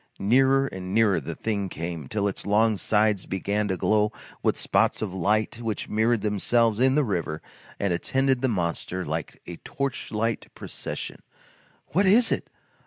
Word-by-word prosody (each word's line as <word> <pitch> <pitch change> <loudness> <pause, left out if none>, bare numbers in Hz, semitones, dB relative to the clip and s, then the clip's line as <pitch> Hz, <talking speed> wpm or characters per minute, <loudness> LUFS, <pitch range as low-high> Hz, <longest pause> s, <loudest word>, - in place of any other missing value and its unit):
Nearer 135 +6 +4
and 95 -5 -5
nearer 105 -6 +4
the 70 - -6
thing 100 -3 -2
came, 85 -4 -5
till 100 +6 -1
its 100 - -4
long 110 +2 +3
sides 105 -1 +1
began 100 +2 -1
to 95 -2 -1
glow 105 +3 +2 0.3
with - - +1
spots - - +1
of 100 -4 -4
light 105 +5 0
which 110 -3 -3
mirrored 110 +1 +2
themselves 110 +2 +1
in 130 +1 +4
the 150 - +4
river 85 - -2 0.4
and 100 -3 +1
attended 130 +7 +1
the 135 - +2
monster 90 -3 -2
like 80 +1 -4
a 85 - -7
torchlight 115 -4 -3
procession. - - -6 0.7
"What 190 +5 +2
is 225 +5 +5
it! - - -1
105 Hz, 160 wpm, -26 LUFS, 95-120 Hz, 0.7 s, is